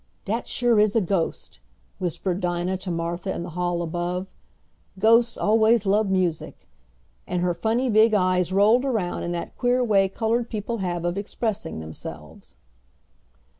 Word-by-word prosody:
"Dat 225 Hz, +4 st, -2 dB
sure 240 Hz, -3 st, +2 dB
is 210 Hz, 0 st, +3 dB
a -, -, +5 dB
ghost," 180 Hz, -2 st, -2 dB, 0.4 s
whispered 180 Hz, 0 st, -2 dB
Dinah 175 Hz, +1 st, -1 dB
to 185 Hz, 0 st, -7 dB
Martha 170 Hz, +2 st, -3 dB
in -, -, -4 dB
the 170 Hz, -, -7 dB
hall 175 Hz, 0 st, -1 dB
above. 175 Hz, +2 st, -3 dB, 0.7 s
"Ghosts 230 Hz, +4 st, +4 dB
always 220 Hz, 0 st, +3 dB
lub 205 Hz, +1 st, +2 dB
music," 180 Hz, -4 st, -2 dB, 0.6 s
and 180 Hz, -1 st, -1 dB
her 180 Hz, -1 st, +1 dB
funny 225 Hz, +8 st, 0 dB
big 220 Hz, -1 st, +4 dB
eyes 185 Hz, -2 st, +2 dB
rolled 210 Hz, +6 st, +4 dB
around 220 Hz, -10 st, -1 dB
in 175 Hz, -, -3 dB
that 170 Hz, -, -5 dB
queer 250 Hz, +1 st, +1 dB
way 195 Hz, -4 st, +3 dB
colored 230 Hz, +3 st, -1 dB
people 225 Hz, +1 st, -4 dB
have 175 Hz, -2 st, -2 dB
of 175 Hz, +3 st, -1 dB
expressing 215 Hz, -, -4 dB
themselves. 80 Hz, 0 st, -10 dB
195 Hz, 150 wpm, -24 LUFS, 175-220 Hz, 0.7 s, a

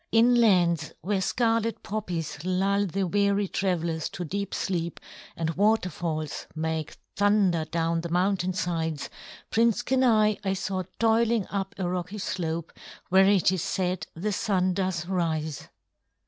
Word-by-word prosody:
In 230 Hz, +2 st, +5 dB
lands 175 Hz, -9 st, +3 dB
where 195 Hz, +2 st, 0 dB
scarlet 230 Hz, +2 st, 0 dB
poppies 170 Hz, -8 st, -4 dB
lull 195 Hz, +2 st, +1 dB
the 195 Hz, +2 st, -1 dB
weary 200 Hz, +2 st, +1 dB
travelers 170 Hz, -5 st, -1 dB
to 175 Hz, -, -5 dB
deep 200 Hz, +4 st, -3 dB
sleep, 170 Hz, -3 st, -2 dB, 0.4 s
and 165 Hz, -1 st, -1 dB
waterfalls 175 Hz, -6 st, 0 dB
make 160 Hz, -1 st, -3 dB, 0.2 s
thunder 200 Hz, -5 st, +3 dB
down 165 Hz, +1 st, -1 dB
the 170 Hz, -, -5 dB
mountain 185 Hz, +1 st, +1 dB
sides, 165 Hz, -4 st, -2 dB, 0.4 s
Prince 230 Hz, +1 st, +3 dB
Kenai 230 Hz, -5 st, +3 dB
I 190 Hz, -1 st, 0 dB
saw 190 Hz, 0 st, -2 dB, 0.2 s
toiling 230 Hz, -1 st, +2 dB
up 195 Hz, -1 st, -3 dB
a 185 Hz, -2 st, -1 dB
rocky 180 Hz, +3 st, -3 dB
slope 170 Hz, -4 st, -3 dB, 0.4 s
where 190 Hz, +1 st, +6 dB
it 195 Hz, -2 st, +4 dB
is 185 Hz, -3 st, -1 dB
said 185 Hz, 0 st, -1 dB
the 200 Hz, +6 st, -2 dB
Sun 185 Hz, -2 st, +1 dB
does 185 Hz, -3 st, -1 dB
rise." 160 Hz, -5 st, -2 dB
185 Hz, 135 wpm, -27 LUFS, 170-205 Hz, 0.4 s, where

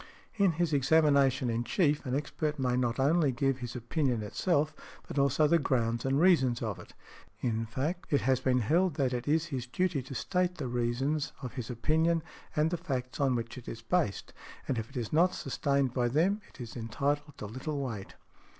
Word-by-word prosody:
In 200 Hz, -5 st, +3 dB
his 165 Hz, -1 st, 0 dB
examination 140 Hz, -2 st, +4 dB
in 115 Hz, +1 st, -1 dB
chief 150 Hz, -, +1 dB
an 125 Hz, -, 0 dB
expert 150 Hz, +1 st, -2 dB
may 125 Hz, -2 st, +1 dB
not 125 Hz, 0 st, 0 dB
only 150 Hz, +1 st, +3 dB
give 135 Hz, +1 st, 0 dB
his 120 Hz, 0 st, -6 dB
opinion 125 Hz, -1 st, -1 dB
itself, 155 Hz, -, 0 dB, 0.3 s
but -, -, -2 dB
also 140 Hz, +2 st, +3 dB
the 170 Hz, +3 st, +4 dB
grounds 120 Hz, -4 st, 0 dB
and 135 Hz, +1 st, +2 dB
reasons 135 Hz, -9 st, +4 dB
of 110 Hz, -4 st, -3 dB
it; -, -, -13 dB, 0.5 s
in 115 Hz, -2 st, -1 dB
fact 150 Hz, +10 st, -3 dB
it 145 Hz, -, +3 dB
has 130 Hz, 0 st, +2 dB
been 125 Hz, -1 st, +2 dB
held 165 Hz, -, +2 dB
that 130 Hz, -3 st, +1 dB
it 125 Hz, +1 st, -3 dB
is 160 Hz, +2 st, +2 dB
his 125 Hz, -2 st, -3 dB
duty 175 Hz, +2 st, 0 dB
to 135 Hz, +2 st, -9 dB
state 180 Hz, +4 st, 0 dB
the 150 Hz, -6 st, -4 dB
reasons 125 Hz, +5 st, -1 dB
of 125 Hz, -, -5 dB
his 125 Hz, -4 st, -5 dB
opinion 160 Hz, +7 st, +1 dB, 0.3 s
and 155 Hz, +2 st, +2 dB
the 175 Hz, -, 0 dB
facts 130 Hz, -7 st, -4 dB
on 135 Hz, -3 st, +2 dB
which 120 Hz, +2 st, -4 dB
it 120 Hz, -, -16 dB
is 115 Hz, 0 st, -7 dB
based, 135 Hz, -, -1 dB, 0.3 s
and 125 Hz, -, 0 dB
if 110 Hz, -, -5 dB
it -, -, -8 dB
is 120 Hz, +1 st, -3 dB
not 175 Hz, +4 st, +4 dB
sustained 140 Hz, -1 st, 0 dB
by 125 Hz, -2 st, +1 dB
them 175 Hz, -, +2 dB
it -, -, -19 dB
is 120 Hz, -2 st, -7 dB
entitled 140 Hz, +6 st, -2 dB
to -, -, -6 dB
little 130 Hz, +7 st, -4 dB
weight. 115 Hz, -8 st, -5 dB
135 Hz, 200 wpm, -30 LUFS, 120-155 Hz, 0.5 s, examination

